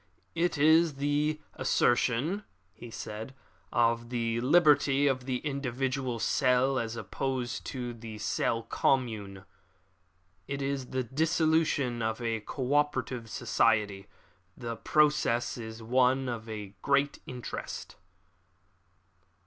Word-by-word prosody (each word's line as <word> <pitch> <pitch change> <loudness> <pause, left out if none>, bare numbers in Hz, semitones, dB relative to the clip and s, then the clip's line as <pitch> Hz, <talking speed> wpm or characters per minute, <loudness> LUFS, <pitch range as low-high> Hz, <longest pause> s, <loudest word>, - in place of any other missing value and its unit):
"It 170 -1 0
is 160 +1 +5
the 145 +2 0
assertion," 130 - +1 0.3
he 120 - -11
said, 110 +3 -7 0.4
"of 120 0 +2
the 115 -1 -1
liberty 145 -1 +4
of 130 -2 0
the 130 -1 0
individual 135 -2 -2
cell 130 +3 +2
as 115 -1 -3
opposed 125 +2 -3
to 125 -2 -4
the 110 -2 -9
cell 115 +2 0
commune. 110 -6 -1 1.0
It 140 0 -3
is 135 -2 -2
the 130 0 -2
dissolution 155 -2 +1
of 110 +1 -1
a 115 -2 -1
co 130 +5 -3
operative 130 -5 0
society. 100 -4 +1 0.5
The 115 -2 -4
process 150 -3 +2
is 110 -1 -8
one 130 +2 +2
of 115 -2 -5 0.3
great 140 0 +2
interest." 125 -2 -6
125 Hz, 110 wpm, -30 LUFS, 115-140 Hz, 1.0 s, is